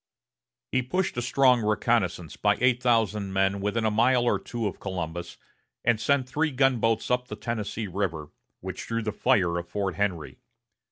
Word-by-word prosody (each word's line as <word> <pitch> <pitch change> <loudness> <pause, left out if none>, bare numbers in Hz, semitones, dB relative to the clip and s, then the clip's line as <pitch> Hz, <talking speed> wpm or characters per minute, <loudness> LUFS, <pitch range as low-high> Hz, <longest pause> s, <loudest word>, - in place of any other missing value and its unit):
He 130 - +2
pushed 180 +9 -1
a - - 0
strong 125 0 +4
reconnaissance 105 -6 0
by 105 -1 +2
eight 125 0 +3
thousand 110 -5 +1
men 95 +1 +1
within 105 +3 -1
a 110 - +2
mile 120 +3 +3
or 120 - +2
two 120 -2 -4
of 100 - -3
Columbus, 85 -3 -5 0.5
and 115 -2 +2
sent 135 +1 +2
three 155 +4 0
gunboats 125 -5 +1
up 125 0 +1
the - - -6
Tennessee 115 -1 -4
River, 90 -6 -3 0.3
which - - -6
drew 115 0 -2
the 110 - -1
fire 90 -4 +2
of 85 0 -9
Fort 100 -2 -2
Henry. 95 -6 -2
110 Hz, 170 wpm, -26 LUFS, 95-125 Hz, 0.5 s, strong